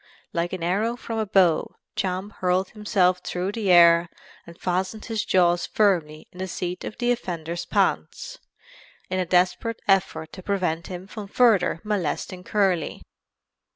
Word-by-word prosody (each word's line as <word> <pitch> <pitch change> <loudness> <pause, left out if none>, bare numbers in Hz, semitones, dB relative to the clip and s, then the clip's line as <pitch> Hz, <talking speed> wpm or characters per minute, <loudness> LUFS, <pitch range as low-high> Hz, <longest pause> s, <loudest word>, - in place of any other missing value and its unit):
Like 170 +1 -1
an 185 -3 -4
arrow 205 +7 0
from 230 -2 -5
a 215 - -1
bow 185 -5 +3 0.2
Champ 190 +2 -2
hurled 185 +1 +1
himself 195 -4 +1
through 180 +1 -3
the 205 -2 -2
air 170 0 +7 0.4
and 170 0 -13
fastened 185 +4 -2
his 225 -2 -2
jaws 175 -2 +2
firmly 165 -8 +1
in 180 - -14
the 190 - -3
seat 180 0 -4
of - - -6
the 240 -1 +1
offender's 170 -8 -3
pants, - - -1 0.7
in 185 - 0
a 180 - -1
desperate 185 +6 +1
effort 195 -5 +1
to 185 - -9
prevent 180 -4 -1
him 180 0 -7
from 205 +1 -8
further 200 -7 +3
molesting 185 -2 -2
Curly." 195 -4 0
185 Hz, 155 wpm, -24 LUFS, 175-205 Hz, 0.7 s, air